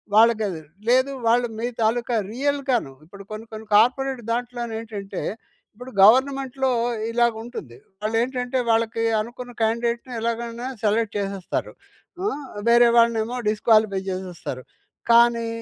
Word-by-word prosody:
వాళ్ళకది. 215 -6 +3 0.3
లేదు, 260 +3 +4 0.2
వాళ్ళు 240 +1 +3
మీ 235 - -1
తాలూకా 235 +2 +1 0.2
రియల్‌గాను 270 - 0
ఇప్పుడు 200 +4 -12
కొన్ని 215 +1 -6
కొన్ని 220 0 -9
కార్పొరేట్ 255 +3 +3
దాంట్లోనేంటంటే 230 -4 -4 0.5
ఇప్పుడు 250 +3 -10
గవర్నమెంట్‌లో 265 +3 +4 0.4
ఇలాగుంటుంది. 230 - -2 0.3
వాళ్ళేంటంటే, 245 +3 -1
వాళ్ళకి 225 0 +1 0.2
అనుకున్న 245 +2 -8
క్యాండేట్‌ని 235 +2 -1
ఎలాగైనా 235 +1 -3 0.2
సెలెక్ట్ 215 0 +1
చేసేస్తారు. 195 -2 -3 0.5
ఆ! - - +2 0.4
వేరే 235 0 +7
వాళ్ళనేమో 230 +1 +2
డిస్‌క్వాలిఫై 215 -2 +3
చేసేస్తారు, 180 -8 -6 0.5
కానీ 235 0 +5
230 Hz, 105 wpm, -23 LUFS, 220-245 Hz, 0.5 s, వేరే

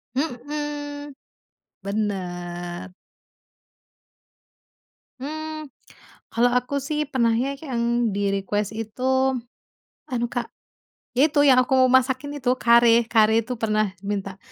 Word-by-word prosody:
Mhm, 290 +1 -4 0.7
benar. 180 -3 -4 2.3
Hmm, 310 +1 -5 0.6
kalau 245 +1 +4
aku 250 +3 -2
sih 300 +2 -2
pernahnya 245 +1 +1
yang 240 -4 0
di 205 - -1
request 205 +2 -1
itu, 260 +4 0 0.7
anu 240 -1 -1
Kak, 240 -2 -2 0.7
ya 300 +4 +5
itu 290 -1 +3
yang 260 -2 +7
aku 265 - +1 0.2
masakin 260 +2 +2
itu, 245 - +1
Kare. 235 0 +5
Kare 220 -1 +5
itu 250 - -3
pernah 215 -1 +2 0.2
minta, 195 -1 -3
240 Hz, 100 wpm, -24 LUFS, 215-275 Hz, 2.3 s, yang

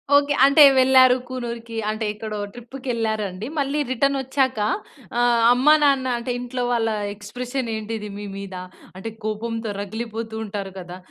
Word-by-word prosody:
Okay. 285 0 +4
అంటే 280 +2 +7
వెళ్లారు 260 -1 +6
కూనూరుకి, 235 -2 -6
అంటే 215 +1 -2
ఎక్కడో 215 0 -6 0.2
ట్రిప్పుకెళ్లారండి, 225 -5 -3
మళ్ళీ 280 +1 0
రిటనొచ్చాక, 265 -1 +1 0.6
ఆహ్, 240 -1 +3
అమ్మా, 275 +5 +5
నాన్న 275 -2 +3
అంటే, 235 +1 -4
ఇంట్లో 245 0 -3
వాళ్ళ 225 -1 +1 0.2
ఎక్స్‌ప్రెషనేంటిది, 225 -1 -4
మీ 205 - -6
మీద? 195 -1 -7 0.4
అంటే, 225 +4 -6
కోపంతో 225 +1 -3
రగిలిపోతూ 220 +2 -5
ఉంటారు 200 -2 -5
కదా! 180 0 -8
235 Hz, 125 wpm, -23 LUFS, 215-260 Hz, 0.6 s, అంటే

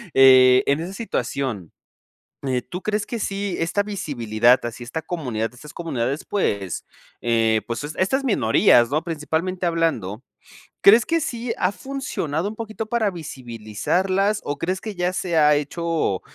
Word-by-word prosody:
eh, 130 -1 +7
en 140 +2 +2
esa 175 +4 -5
situación, 130 - -3 0.8
eh, 125 -2 0
¿tú 180 +1 -7
crees 210 -1 -1
que 235 - -4
sí 200 -2 -2
esta 165 +5 0
visibilidad, 125 - +2
así 120 +1 -5
esta 160 +7 -5
comunidad, 125 -10 -3
estas 145 +4 -13
comunidades, 140 -4 -2
pues 100 - -2 0.4
eh, 115 -2 +2
pues 120 +3 -4
es 150 - -5
estas 265 +9 +1
minorías, 170 - +4
¿no?, 155 +3 0
principalmente 165 +3 -2
hablando. 145 - -1 0.6
¿Crees 220 +3 +7
que 330 0 +1
sí 240 -5 -3
ha 180 - +2
funcionado 200 - -3
un 215 - -8
poquito 220 0 -5
para 220 -3 +1
visibilizarlas 165 - -1
o 145 - -3
crees 185 +5 -2
que 215 -3 -6
ya 180 +1 0
se 175 -3 -1
ha 150 -1 +6
hecho 155 - -1
160 Hz, 150 wpm, -22 LUFS, 125-195 Hz, 0.8 s, eh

